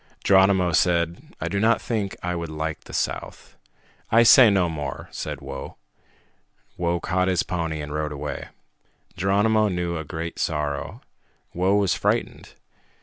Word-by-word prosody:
Geronimo 95 -2 +4
said, 85 0 0
"I 80 - -3
do 100 +3 -1
not 110 +3 +3
think 105 -5 -3
I 90 0 -1
would 85 -1 -4
like 80 +1 -4
the - - -11
south." - - -4 0.6
"I 115 +1 +6
say 120 0 +8
no 95 -3 +2
more," 75 -3 -5
said - - -5
Whoa. 70 0 -8 1.0
Whoa 85 0 -1
caught 90 +1 0
his 90 -2 +1
pony 80 -4 -3
and 75 0 -6
rode 75 0 -2
away. 70 - -5 0.7
Geronimo 105 +3 +2
knew 90 -2 -2
a 80 - -4
great 80 +2 -6
sorrow. 75 -3 -2 0.5
Whoa 95 +3 +1
was 100 -4 +2
frightened. - - -2
90 Hz, 145 wpm, -24 LUFS, 80-95 Hz, 1.0 s, say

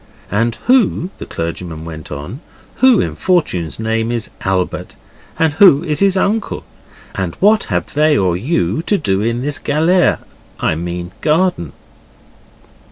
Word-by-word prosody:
'And 115 +3 +1
who,' 225 -8 +2
the - - -7
clergyman 80 -1 -5
went 80 -2 -9
on, 75 - -6 0.4
'who 260 -4 +5
in - - -1
fortune's 95 - 0
name 110 +1 -1
is 115 -3 -3
Albert? 95 -1 -2 0.4
And 160 -2 +2
who 160 -3 +6
is 155 -3 -1
his 195 -1 +3
uncle? 210 +3 -1 0.5
And 95 -3 -3
what 210 +2 +3
have - - -3
they 150 0 +3
or 90 -3 +1
you 100 - 0
to 205 - +3
do 100 - 0
in 115 +3 -1
this 145 +1 -3
galere 165 +5 +2 0.4
I - - +1
mean 85 +2 -5
garden? 155 - +1
120 Hz, 145 wpm, -17 LUFS, -, 0.5 s, who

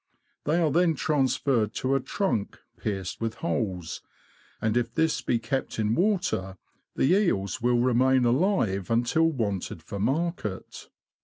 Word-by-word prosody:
They 155 +3 +2
are 160 -3 +2
then 170 +1 +3
transferred 130 -6 +1
to 130 +1 0
a 135 - +3
trunk 130 - -2 0.2
pierced 95 -2 -4
with 115 0 -2
holes, 95 - -3 0.6
and 110 0 0
if 120 -1 0
this 160 -1 +1
be 120 - +1
kept 115 +4 -3
in 110 0 +1
water, 175 - 0 0.4
the 135 - +2
eels 110 - +1
will 120 +1 +3
remain 130 +1 +3
alive 120 - +1
until 120 +8 +2
wanted 100 - -3
for 100 +4 -6
market. 135 - -2
120 Hz, 140 wpm, -27 LUFS, 105-155 Hz, 0.6 s, then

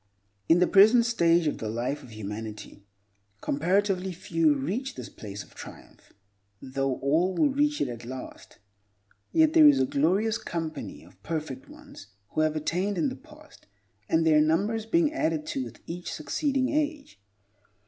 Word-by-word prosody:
In 165 - +6
the 180 - +4
present 220 +6 +6
stage 170 -7 +3
of 150 - -1
the 110 - -4
life 125 +6 -3
of 130 - -13
humanity, 105 -1 -8 0.5
comparatively 185 - 0
few 165 -4 +1
reach 215 - -3
this - - -8
place 100 -1 -8
of - - -20
triumph—though 100 +7 -7
all 165 +7 +1
will 295 -3 +3
reach 295 +2 +1
it - - +1
at 120 -1 -7
last—yet 105 - -4
there 315 -2 +8
is 290 - +6
a 130 - +3
glorious 195 +12 +1
company 165 -2 -5
of - - -20
perfect 155 -5 -5
ones - - -13 0.2
who - - -1
have 155 0 +1
attained 180 +6 -1
in 165 - +1
the - - -7
past, - - -18 0.4
and 160 0 +2
their 155 -1 +5
number 165 +8 +2
is 225 -1 -4
being 315 +3 +2
added 310 -1 -1
to 290 -4 -3
with - - -12
each 175 +1 -6
succeeding 265 - -1
age. 295 - -2
165 Hz, 160 wpm, -27 LUFS, -, 0.5 s, there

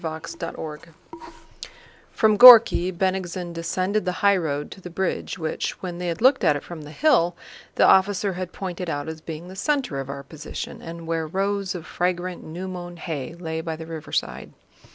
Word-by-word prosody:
CHAPTER 165 0 -6
XXIII 160 +1 -8 1.2
From 215 -2 +3
Górki, 230 -6 +9
Bennigsen 185 -1 -2
descended 185 +5 -1
the 180 0 -1
highroad 160 -8 +1
to 190 - -11
the 180 - -8
bridge 190 +2 -3
which, 160 -3 -3
when 175 -2 -5
they 180 - -3
had 170 +2 -3
looked 260 +1 +5
at 150 - +4
it 145 - -5
from 170 -3 -9
the 150 - -10
hill, 175 - +2 0.4
the - - +4
officer 195 +1 +4
had 180 0 -5
pointed 180 -2 -5
out 145 -1 -3
as 160 0 -6
being 160 +2 -7
the 185 - -10
center 265 - -1
of 135 0 -6
our 140 0 -6
position 150 +2 -8
and 165 0 -8
where 165 -1 -2
rows 195 +2 -1
of 170 - -7
fragrant 180 0 -2
new 175 +4 -6
mown 175 -1 -7
hay 160 -3 -5
lay 160 -2 -4
by 160 -1 -4
the 160 +1 -8
riverside. 160 - -4
175 Hz, 180 wpm, -24 LUFS, 160-190 Hz, 1.2 s, Górki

